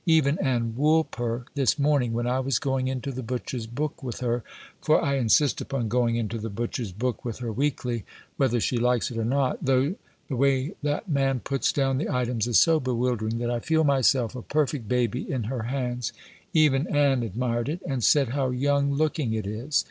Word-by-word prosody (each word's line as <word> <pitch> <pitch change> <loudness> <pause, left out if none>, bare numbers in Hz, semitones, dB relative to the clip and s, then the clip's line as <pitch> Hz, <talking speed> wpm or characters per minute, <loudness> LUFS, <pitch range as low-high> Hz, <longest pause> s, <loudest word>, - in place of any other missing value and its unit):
Even 155 -2 +3
Ann 120 -4 0
Woolper 135 -6 +1
this 140 0 +2
morning, 140 -4 +2
when 120 +1 -1
I 125 +2 +1
was 130 -1 +1
going 135 -1 -1
into 130 +1 -3
the 130 0 -5
butcher's 125 -1 -4
book 145 +6 -4
with 125 -4 -5
her 120 -1 0 0.4
for - - +4
I 140 0 0
insist 135 +3 +3
upon 135 -5 -2
going 120 0 +2
into 115 0 -2
the 110 +1 -4
butcher's 115 0 -3
book 120 +4 -3
with 115 -3 -4
her 120 -2 -4
weekly, 125 -2 -1 0.3
whether 120 -3 +2
she 120 - 0
likes 125 0 +1
it 115 - -6
or - - 0
not; 130 +3 0
though 135 +4 +2 0.3
the 135 - -3
way 135 +5 +1
that 145 +8 -2
man 135 -4 +1
puts 135 +2 0
down 135 -2 +1
the - - -2
items 120 -3 0
is 120 - +3
so 165 -1 +5
bewildering 120 -4 -1
that 120 0 -1
I 120 - 0
feel 160 +6 +1
myself 130 -4 +2
a 125 - -5
perfect 140 -5 -1
baby 125 -1 0
in 130 -4 -1
her 120 +2 -3
hands, 125 -1 -3 0.4
even 150 -1 +3
Ann 140 -3 +2
admired 120 +3 -2
it, 170 +4 -4
and 135 -4 -2
said 140 0 +4
how 135 +1 0
young 140 +2 +1
looking 150 -5 0
it 110 -2 -2
is. 115 +9 -1
125 Hz, 200 wpm, -26 LUFS, 120-140 Hz, 0.4 s, so